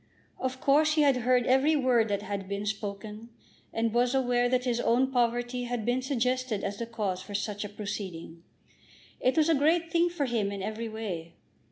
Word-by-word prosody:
Of 260 0 -3
course 305 +3 +3
he 305 - +4
had 275 -3 +4
heard 250 0 +2
every 265 +5 +4
word 250 -5 +3
that 205 -1 -2
had 200 -2 -5
been 200 +1 -3
spoken, 210 +2 -5 0.4
and 225 -1 -1
was 245 +2 +2
aware 245 -2 +2
that 250 0 +1
his 245 -2 0
own 250 +3 +2
poverty 245 0 0
had 240 -3 -3
been 245 +2 +1
suggested 255 -4 -1
as 200 0 -3
the 235 - -4
cause 205 -5 -2
for 205 +1 -7
such 205 0 -2
a 205 - -5
proceeding. 195 -5 -6 0.8
It 255 +5 +1
was 310 -1 +4
a 330 - +4
great 325 +3 +2
thing 340 +1 +3
for 340 -5 -2
him 225 -5 -1
in 200 -1 -5
every 220 +2 -4
way. 185 -7 -6
240 Hz, 195 wpm, -28 LUFS, 205-260 Hz, 0.8 s, he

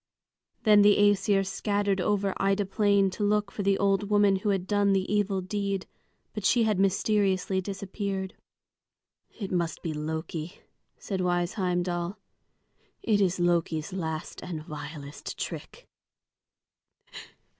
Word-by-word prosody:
Then 210 -2 +6
the 205 0 +6
Æsir 205 -1 +3
scattered 200 0 0
over 200 0 +1
Ida 195 +1 +1
Plain 200 0 +2
to 205 - -4
look 205 0 +1
for - - -4
the 195 0 +2
old 200 0 +1
woman 205 -2 +4
who 200 +2 -2
had 190 -2 0
done 205 0 +2
the 190 -1 +1
evil 200 -2 +1
deed; 200 0 -2 0.5
but 210 - -5
she 230 +5 +4
had 215 -4 +1
mysteriously 195 -1 +1
disappeared. 195 0 -4 1.0
"It 200 -4 -7
must 170 -2 -1
be 165 - -2
Loki," 160 +3 -4 0.4
said 190 -2 -3
wise 175 -1 0
Heimdal. 180 0 -1 0.9
"It 210 -2 +2
is 185 -1 +1
Loki's 170 -1 0
last 160 -4 -4
and 160 -4 -6
vilest 150 -1 -8
trick." - - -6
195 Hz, 130 wpm, -28 LUFS, 180-205 Hz, 1.0 s, Then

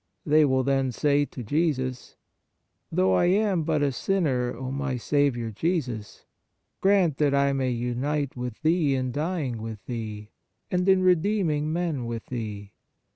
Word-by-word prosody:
They 155 -1 +5
will 130 -1 +2
then 135 -1 +1
say 145 +3 +2
to 125 - -8
Jesus: 130 -1 -1 0.4
" - - -50
Though 95 0 +2
I 90 - +3
am 195 -1 +2
but 155 -2 0
a 140 - +2
sinner, 130 -5 0
O 130 +2 -5
my 135 -1 -2
Saviour 120 -3 0
Jesus, 125 - -3 0.6
grant 190 -7 +3
that 145 -2 +3
I 140 0 +3
may 135 -1 0
unite 125 +4 -2
with 125 -2 -5
Thee 155 -3 +3
in 130 -1 -1
dying 145 -5 -2
with 110 -2 -7
Thee, 110 -3 -6 0.4
and 180 +1 +1
in 190 -1 +5
redeeming 175 -4 +2
men 160 -7 -2
with 115 -1 -5
Thee. 105 -5 -6
140 Hz, 155 wpm, -26 LUFS, 120-160 Hz, 0.6 s, They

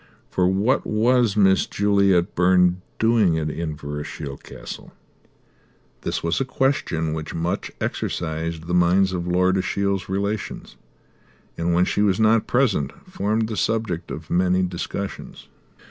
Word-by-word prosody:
For 90 -1 +2
what 100 +8 +2
was 115 0 +2
Miss 95 -2 +4
Juliet 100 -2 +2
Byrne 90 0 +3 0.2
doing 110 -7 +3
at 75 -1 -1
Inverashiel 75 -2 -5
Castle? - - -9 1.1
This - - -3
was 85 +8 0
a - - +3
question 130 - 0
which 80 -1 -5
much 85 +4 -2
exercised 80 0 -3
the 90 - -3
minds 90 +2 +3
of 90 -1 -3
Lord 90 +2 +2
Ashiel's 100 -1 -1
relations 100 +2 -3 0.8
and, 85 +1 -1
when 90 +1 +4
she 105 - 0
was 100 -1 +2
not 110 0 +3
present, 105 - +1 0.2
formed 110 +2 0
the 110 - -4
subject 110 -5 -1
of 80 0 -7
many 90 +1 +2
discussions. 90 +2 -5
95 Hz, 130 wpm, -23 LUFS, 85-105 Hz, 1.1 s, Miss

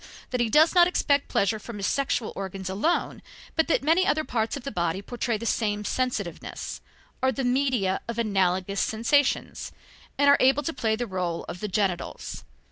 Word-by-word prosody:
that 250 -1 0
he 235 - +1
does 310 +7 +5
not 350 -1 +7
expect 285 -5 +1
pleasure 215 +2 +1
from 225 0 -8
his 200 - -3
sexual 270 -3 0
organs 190 -1 -5
alone, 310 - 0 0.3
but 320 - +2
that 330 - +1
many 325 +5 +4
other 310 -3 +1
parts 225 -2 -1
of 275 - -9
the 275 - -4
body 170 -2 -1
portray 235 +2 -2
the 230 - -7
same 210 -2 0
sensitiveness, 230 -9 -3 0.4
are 260 - +3
the 265 +2 -3
media 245 -7 +1
of 235 -1 -4
analogous 195 -3 +1
sensations, 255 +6 +1 0.5
and 285 - +3
are 280 - +7
able 270 +3 +4
to 325 - -2
play 220 -5 0
the 245 +2 -3
role 180 -5 -3
of 180 - -6
the 210 - -3
genitals. 190 -3 -2
230 Hz, 185 wpm, -26 LUFS, 195-275 Hz, 0.5 s, not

